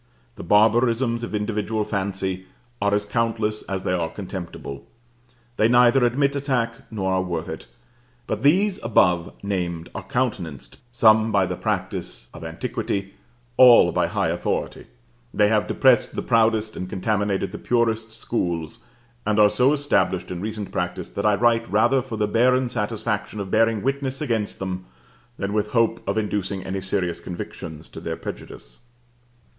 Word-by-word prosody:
The - - -8
barbarisms 115 +4 +3
of 120 - -4
individual 105 +1 -1
fancy 95 -2 -3 0.3
are 100 0 +2
as 105 0 +1
countless 110 0 -1
as 95 -1 -3
they - - 0
are 85 -3 0
contemptible; 90 -7 -7 0.7
they 110 - +4
neither 120 +2 +5
admit 140 +4 +2
attack 130 -5 0 0.2
nor 95 -4 -1
are 95 - +2
worth 85 -3 -3
it; - - -7 0.6
but 110 -1 -3
these 185 +8 +3
above 90 -6 +3
named 90 -4 -3
are - - -5
countenanced, 105 - -3
some 110 -2 +4
by 100 -2 +3
the - - -3
practice - - -3
of - - -10
antiquity, 100 0 -3 0.4
all 125 -2 +8
by - - +1
high - - 0
authority: - - -3 0.5
they 105 0 +4
have 110 -1 +2
depressed 130 -3 +3
the - - -2
proudest, 110 -2 +2
and 90 - -5
contaminated 100 0 -1
the - - -7
purest 115 -2 0
schools, 85 -8 -3 0.4
and 105 0 0
are 105 -1 +6
so 130 +3 +3
established 95 -12 +1
in 90 -1 -4
recent 105 -1 -4
practice - - -3
that - - -1
I 105 - +4
write 115 +1 +2
rather 120 +6 +3
for 120 -3 -6
the 105 -1 +1
barren 125 +3 +3
satisfaction 105 -1 -3
of 95 -1 -5
bearing 115 -1 +2
witness 135 0 -1
against 115 -8 -1
them, 95 -1 -4 0.5
than 100 +1 -3
with 105 0 -1
hope 115 -2 +2
of 100 - 0
inducing 100 -3 -2
any 95 +1 -4
serious 90 -3 -2
convictions 80 -3 -7
to - - -9
their - - -4
prejudice. - - -9
105 Hz, 155 wpm, -23 LUFS, 95-115 Hz, 0.7 s, all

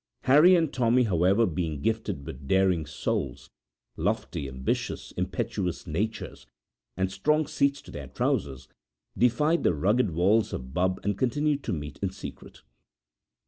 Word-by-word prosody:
Harry 155 +8 +6
and 165 -4 +1
Tommy, 125 0 +3
however, 95 +2 +3
being 80 -4 -2
gifted 105 -5 -2
with 70 -3 -8
daring 95 -3 +2
souls, 70 -3 -3 0.4
lofty, 100 -5 -2
ambitious, 65 -1 -3
impetuous 90 -4 -3
natures, 100 +7 -4 0.5
and 95 0 0
strong 150 +11 +1
seats 140 0 0
to - - -12
their 70 -2 -7
trousers, 65 0 -2 0.5
defied 150 +8 +2
the 85 - +2
rugged 105 - +2
walls 95 +7 +2
of 65 0 -6
Bubb 90 +2 +1
and 100 -1 -1
continued 145 +3 +1
to - - -2
meet 75 -2 -6
in 95 - 0
secret. 95 - -10
95 Hz, 140 wpm, -27 LUFS, 80-120 Hz, 0.5 s, Harry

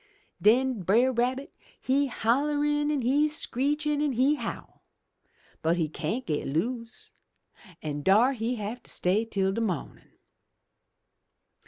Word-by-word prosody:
*'Den 245 +1 +3
Brer 230 +9 +3
Rabbit 255 +3 -1 0.3
he 275 +2 +1
holler 280 +5 +1
an' 295 -2 0
he 285 +5 +3
screech 295 0 -1
an' 295 -1 +1
he 260 +5 +3
howl! 240 -6 -6 0.8
But 165 +2 +1
he 165 -3 +1
cyan't 160 - -3
get 150 -3 -2
loose, 230 - -3 0.7
an' 145 -1 -3
dar 215 - +4
he 235 0 -2
have 220 +2 -5
to - - -16
stay 195 +5 +1
till 195 -3 0
de 230 - -2
mawnin'. 185 -10 -4
245 Hz, 130 wpm, -27 LUFS, 200-275 Hz, 0.8 s, dar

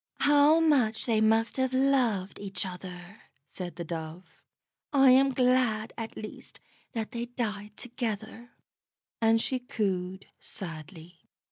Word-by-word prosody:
"How 290 +2 +5
much 265 -9 +2
they 225 -3 +2
must 225 +2 +2
have 260 0 0
loved 250 -8 +1
each 195 -2 -1
other!" 180 +1 -9 0.3
said 180 -2 -6
the 175 - -5
Dove. 165 +1 -8 0.5
"I 270 -3 +6
am 270 +2 +6
glad 250 -4 +1
at 225 -1 -6
least 215 - -9 0.3
that 220 -2 -3
they 240 -1 -4
died 210 -4 -4
together," 230 -1 -5 0.7
and 225 0 +4
she 255 +3 -1
cooed 190 -5 -3
sadly. 165 0 -9
220 Hz, 125 wpm, -29 LUFS, 190-250 Hz, 0.7 s, I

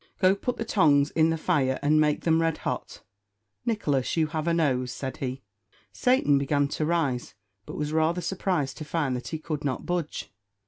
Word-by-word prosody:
Go 185 -1 +4
put 245 +5 -3
the 230 - -3
tongs 150 -9 +3
in 160 0 +3
the 165 - 0
fire, 130 -4 +1
and 155 +1 +4
make 150 -1 +2
them 165 -1 +3
red 165 -1 +1
hot. - - -4 0.6
Nicholas, 150 - 0
you 160 - +4
have 155 +1 -3
a 170 - +3
nose," 130 -6 +1
said 130 0 -5
he. 130 0 -4 0.5
Satan 250 - +3
began 140 0 +1
to 155 +1 -2
rise, 145 -10 -1 0.3
but - - -7
was 150 0 -2
rather 160 +2 +2
surprised 180 -7 -1
to - - -4
find 150 -4 -1
that 125 - -5
he 160 - -3
could 155 -1 -4
not 135 -3 -2
budge. 175 -3 -3
155 Hz, 190 wpm, -27 LUFS, 140-165 Hz, 0.6 s, Go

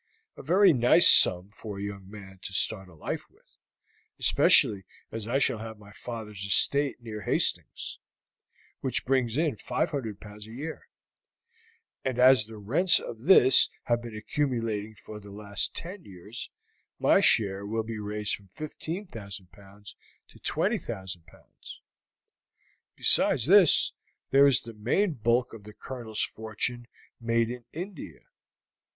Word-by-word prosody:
A - - -10
very 185 +5 +4
nice 125 +7 +5
sum 90 +3 +5
for 105 -1 -9
a 100 - -6
young 100 -2 -7
man 95 -2 -12
to 95 - -7
start 95 0 0
life 80 -3 -6
with, - - -28 0.6
especially 100 -2 +5 0.3
as 110 -1 -6
I 125 +3 0
shall 130 -5 +1
have 110 0 -8
my 105 -1 -16
father's 105 -4 -8
estate 135 +6 +1
near 110 -2 -7
Hastings, - - -2 0.8
which 130 - -2
brings 130 -2 0
in 155 -7 0
500 135 - -3
pounds 105 0 -12
a 110 - -12
year; 150 +6 -8 1.2
and 130 -2 -3
as 125 -3 +6
the 110 0 -12
rents 140 - +3
of 115 -1 -9
this 135 -8 +6
have 120 0 0
been 115 -2 -9
accumulating 110 -3 -3
for 105 0 -11
the 100 -1 -14
last 100 0 -2
ten 180 +2 -6
years, 100 +4 -8 0.5
my - - +3
share 100 -2 +3
will 110 +2 -3
be 110 0 -6
raised 105 0 -3
from 100 - -19
15,000 115 - -8
pounds 100 +1 -15 0.3
to - - -18
20,000 95 -3 -3
pounds. - - -15 1.1
Besides - - +2
this, - - +5 0.4
there 140 +1 +6
is 135 -3 +5
the 115 - -10
main 130 - 0
bulk 120 0 0
of 110 -3 -11
the 105 - -12
Colonel's 115 -5 -5
fortune 115 +2 -4 0.3
made 115 0 0
in 125 -1 -9
India. 180 +5 -8
110 Hz, 140 wpm, -27 LUFS, 105-130 Hz, 1.2 s, as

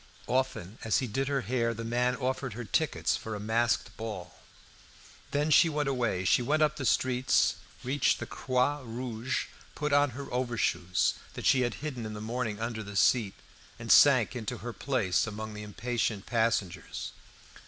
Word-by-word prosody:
Often, 120 -6 -1
as 115 - +2
he 130 - 0
did 135 +4 -2
her 140 -1 0
hair, 115 +1 0
the 115 - -5
man 125 +2 +1
offered 130 -1 -2
her 120 +3 -5
tickets 105 - 0
for 110 -1 -5
a - - -5
masked 115 +2 0
ball. 105 -6 -6 1.0
Then 150 +2 0
she 165 +3 +7
went 150 -2 -1
away. 120 -9 0
She 110 - +4
went 155 +5 +2
up 150 0 +1
the 135 - -1
streets; 130 +2 +2 0.3
reached 135 +3 +2
the - - -4
Croix 130 +3 0
Rouge, 120 +1 -3 0.3
put 150 -1 -1
on 145 0 +5
her 140 - -5
overshoes, 105 -8 +1 0.2
that - - -6
she 130 -2 +5
had 120 -2 0
hidden 125 -7 -4
in 110 - -6
the - - -6
morning 110 -1 -3
under 115 -1 -3
the 100 -1 -8
seat, 100 0 +3 0.4
and - - -3
sank - - +6
into 115 -4 -4
her 120 +2 -6
place 115 -9 0
among 110 0 -5
the 105 - -7
impatient 110 0 -2
passengers. 115 -6 -1
120 Hz, 175 wpm, -29 LUFS, 110-130 Hz, 1.0 s, she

